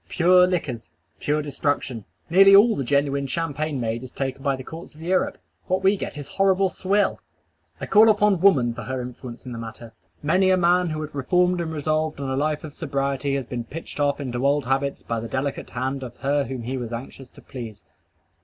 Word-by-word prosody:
"Pure 180 Hz, +1 st, +5 dB
liquors:" 145 Hz, -10 st, -3 dB, 0.3 s
pure 150 Hz, +1 st, 0 dB
destruction! 145 Hz, -6 st, -2 dB, 0.2 s
Nearly 195 Hz, +3 st, +7 dB
all 220 Hz, +3 st, +6 dB
the 140 Hz, -, -2 dB
genuine 140 Hz, +1 st, +1 dB
champagne 155 Hz, -1 st, -2 dB
made 115 Hz, 0 st, -2 dB
is 130 Hz, -, -8 dB
taken 135 Hz, +1 st, -4 dB
by 140 Hz, -1 st, +1 dB
the 130 Hz, -, -8 dB
courts 165 Hz, +3 st, -10 dB
of 155 Hz, -, -14 dB
Europe. 185 Hz, +2 st, 0 dB, 0.3 s
What 185 Hz, 0 st, 0 dB
we 195 Hz, +2 st, +5 dB
get 190 Hz, -, -6 dB
is 145 Hz, -, -7 dB
horrible 195 Hz, 0 st, +2 dB
swill! 195 Hz, +2 st, 0 dB, 0.6 s
I -, -, -4 dB
call 220 Hz, +1 st, +6 dB
upon 210 Hz, -4 st, +3 dB
woman 135 Hz, -12 st, +4 dB
for -, -, -7 dB
her 130 Hz, 0 st, -4 dB
influence 125 Hz, 0 st, -8 dB
in 125 Hz, -, -7 dB
the 115 Hz, -, -6 dB
matter. 115 Hz, 0 st, -9 dB, 0.3 s
Many 185 Hz, +5 st, +3 dB
a 185 Hz, -, +4 dB
man 180 Hz, 0 st, +3 dB
who 155 Hz, 0 st, -3 dB
had 155 Hz, -, -8 dB
reformed 180 Hz, +6 st, +2 dB
and 165 Hz, -1 st, -3 dB
resolved 155 Hz, 0 st, -1 dB
on 135 Hz, -1 st, -3 dB
a -, -, 0 dB
life 150 Hz, +2 st, -1 dB
of 155 Hz, -2 st, -8 dB
sobriety 140 Hz, -2 st, -1 dB
has 135 Hz, -2 st, -2 dB
been 120 Hz, 0 st, -4 dB
pitched 155 Hz, +4 st, -8 dB
off 145 Hz, 0 st, +1 dB
into 125 Hz, -3 st, -3 dB
old 140 Hz, -1 st, +2 dB
habits 135 Hz, +2 st, -1 dB
by 115 Hz, -1 st, -2 dB
the 115 Hz, -, -5 dB
delicate 135 Hz, +3 st, -3 dB
hand 135 Hz, +1 st, -3 dB
of 125 Hz, -2 st, -8 dB
her 140 Hz, +1 st, 0 dB
whom 125 Hz, -1 st, -5 dB
he 130 Hz, +3 st, -3 dB
was 120 Hz, -2 st, -5 dB
anxious 125 Hz, +2 st, -8 dB
to -, -, -17 dB
please. 115 Hz, -5 st, -8 dB
140 Hz, 210 wpm, -24 LUFS, 130-170 Hz, 0.6 s, Nearly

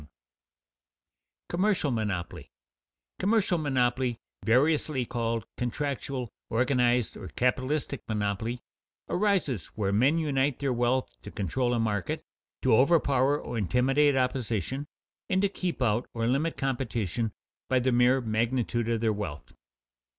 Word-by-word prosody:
[Sidenote: 75 Hz, -, -16 dB, 1.4 s
Commercial 190 Hz, -6 st, +1 dB
monopoly] 105 Hz, -, -3 dB, 0.7 s
Commercial 195 Hz, -3 st, +2 dB
monopoly, 130 Hz, -4 st, +1 dB, 0.3 s
variously 140 Hz, +2 st, +2 dB
called 115 Hz, -1 st, -2 dB
contractual, 130 Hz, -1 st, -3 dB, 0.2 s
organized, 125 Hz, -1 st, +2 dB
or -, -, -8 dB
capitalistic 130 Hz, +3 st, -1 dB
monopoly, 110 Hz, +3 st, -2 dB, 0.5 s
arises 180 Hz, -, 0 dB
where 100 Hz, -3 st, 0 dB
men 130 Hz, +10 st, +4 dB
unite 145 Hz, -4 st, +1 dB
their 140 Hz, -2 st, 0 dB
wealth 120 Hz, -, 0 dB
to -, -, -9 dB
control 120 Hz, +6 st, -1 dB
a -, -, 0 dB
market, 105 Hz, -5 st, -1 dB, 0.4 s
to 125 Hz, -4 st, +5 dB
overpower 140 Hz, 0 st, +3 dB
or 115 Hz, -, -4 dB
intimidate 135 Hz, +7 st, +3 dB
opposition, 130 Hz, -, -1 dB, 0.4 s
and 190 Hz, +1 st, +2 dB
to 200 Hz, -, +3 dB
keep 180 Hz, -8 st, -2 dB
out 115 Hz, +1 st, +1 dB
or 115 Hz, 0 st, 0 dB
limit 140 Hz, +7 st, 0 dB
competition 120 Hz, -5 st, -1 dB, 0.4 s
by 130 Hz, -, +3 dB
the 130 Hz, +1 st, +2 dB
mere 125 Hz, +2 st, +4 dB
magnitude 115 Hz, +1 st, 0 dB
of 115 Hz, -1 st, 0 dB
their 110 Hz, -2 st, +2 dB
wealth. 100 Hz, -9 st, -6 dB
125 Hz, 120 wpm, -28 LUFS, 115-140 Hz, 1.4 s, to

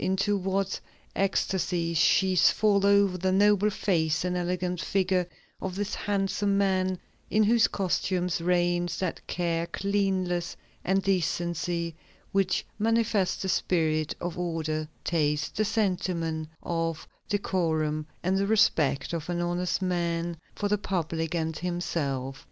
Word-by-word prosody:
Into 195 Hz, +2 st, +1 dB
what 195 Hz, 0 st, -1 dB, 0.4 s
ecstasies 180 Hz, -3 st, 0 dB
she 190 Hz, +4 st, +4 dB
falls 200 Hz, +2 st, +4 dB
over 200 Hz, -2 st, +4 dB
the 185 Hz, +1 st, +1 dB
noble 205 Hz, +1 st, +4 dB
face 165 Hz, -5 st, 0 dB
and 180 Hz, 0 st, -1 dB
elegant 180 Hz, 0 st, -1 dB
figure 185 Hz, 0 st, +1 dB, 0.3 s
of 185 Hz, -1 st, -4 dB
this 205 Hz, +1 st, -3 dB
handsome 200 Hz, 0 st, 0 dB
man, 185 Hz, -2 st, +1 dB, 0.3 s
in 215 Hz, -, +3 dB
whose 225 Hz, +1 st, +5 dB
costume 185 Hz, -1 st, 0 dB
"reigns 175 Hz, 0 st, +1 dB
that 185 Hz, -3 st, -2 dB
care, 170 Hz, -1 st, -1 dB
cleanliness, 190 Hz, -3 st, -1 dB, 0.3 s
and 195 Hz, +1 st, +1 dB
decency 170 Hz, -2 st, -1 dB, 0.4 s
which 195 Hz, -2 st, +1 dB
manifest 220 Hz, -4 st, +1 dB
the 190 Hz, -, -2 dB
spirit 155 Hz, -4 st, +1 dB
of 175 Hz, 0 st, -4 dB
order, 155 Hz, -3 st, -2 dB, 0.2 s
taste, 150 Hz, -3 st, 0 dB
the 215 Hz, -, +2 dB
sentiment 180 Hz, -7 st, -1 dB
of 165 Hz, -1 st, -2 dB, 0.2 s
decorum, 160 Hz, -6 st, 0 dB, 0.2 s
and 190 Hz, +2 st, +1 dB
the 200 Hz, -, +1 dB
respect 170 Hz, -10 st, +2 dB
of 165 Hz, 0 st, -4 dB
an 175 Hz, -1 st, -1 dB
honest 175 Hz, +2 st, -1 dB
man 170 Hz, -2 st, -1 dB, 0.2 s
for 205 Hz, -, -1 dB
the 205 Hz, 0 st, +1 dB
public 165 Hz, -3 st, -2 dB
and 160 Hz, -1 st, -2 dB
himself"! 140 Hz, -7 st, -2 dB
180 Hz, 130 wpm, -28 LUFS, 165-195 Hz, 0.4 s, whose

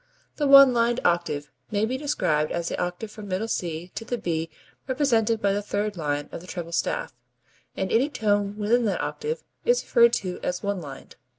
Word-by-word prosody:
The 290 Hz, -, +1 dB
one 275 Hz, -2 st, +9 dB
lined 235 Hz, +1 st, +2 dB
octave 170 Hz, -5 st, 0 dB, 0.2 s
may 205 Hz, +1 st, +1 dB
be 250 Hz, +4 st, -2 dB
described 210 Hz, -, 0 dB
as 170 Hz, -1 st, -2 dB
the -, -, -3 dB
octave 180 Hz, +5 st, -4 dB
from 210 Hz, -1 st, -9 dB
middle 195 Hz, +4 st, -2 dB
C 175 Hz, -4 st, -3 dB
to -, -, -5 dB
the 245 Hz, +2 st, -3 dB
B 165 Hz, -6 st, -2 dB, 0.4 s
represented 235 Hz, -5 st, +2 dB
by 200 Hz, -1 st, +3 dB
the 205 Hz, -, -1 dB
third 205 Hz, 0 st, -2 dB
line 145 Hz, -3 st, -2 dB
of -, -, -7 dB
the 180 Hz, -, -13 dB
treble 175 Hz, -2 st, -6 dB
staff, -, -, -1 dB, 0.6 s
and 190 Hz, -, -2 dB
any 255 Hz, +6 st, +3 dB
tone 205 Hz, -5 st, 0 dB
within 230 Hz, +3 st, +2 dB
that 205 Hz, -, 0 dB
octave 465 Hz, +2 st, -3 dB, 0.2 s
is 485 Hz, +1 st, +2 dB
referred 235 Hz, -1 st, +5 dB
to 185 Hz, -5 st, -2 dB
as 180 Hz, +2 st, -3 dB
"one 200 Hz, -2 st, -1 dB
lined." 140 Hz, -4 st, -10 dB
205 Hz, 195 wpm, -25 LUFS, 175-235 Hz, 0.6 s, one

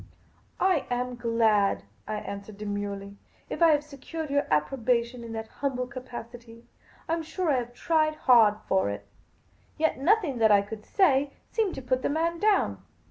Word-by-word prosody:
" -, -, -34 dB
I 370 Hz, -7 st, +2 dB
am 250 Hz, 0 st, -2 dB
glad," 225 Hz, -, +2 dB, 0.2 s
I -, -, -2 dB
answered 200 Hz, 0 st, -7 dB
demurely, 205 Hz, -1 st, -5 dB, 0.2 s
" -, -, -34 dB
if -, -, -4 dB
I 335 Hz, -, +8 dB
have 295 Hz, -2 st, +3 dB
secured 300 Hz, +1 st, -7 dB
your 285 Hz, 0 st, +1 dB
approbation 235 Hz, -, 0 dB
in 230 Hz, -, -8 dB
that 220 Hz, 0 st, -5 dB
humble 260 Hz, -3 st, 0 dB
capacity. 240 Hz, -2 st, -10 dB, 0.4 s
I 325 Hz, -, 0 dB
am 330 Hz, -, 0 dB
sure 330 Hz, +1 st, -1 dB
I 270 Hz, -, +3 dB
have 240 Hz, 0 st, -4 dB
tried 310 Hz, 0 st, +1 dB
hard 230 Hz, -7 st, +5 dB
for 190 Hz, -, +2 dB
it." 100 Hz, 0 st, -5 dB, 0.7 s
Yet 315 Hz, -3 st, +1 dB
nothing 325 Hz, -, +2 dB
that 220 Hz, -1 st, +5 dB
I 200 Hz, -1 st, +5 dB
could 210 Hz, +1 st, -9 dB
say 285 Hz, -8 st, +3 dB, 0.2 s
seemed 435 Hz, -5 st, 0 dB
to 270 Hz, -, -7 dB
put 255 Hz, +1 st, 0 dB
the -, -, 0 dB
man 335 Hz, +3 st, 0 dB
down. 420 Hz, 0 st, +2 dB
250 Hz, 180 wpm, -27 LUFS, 220-305 Hz, 0.7 s, I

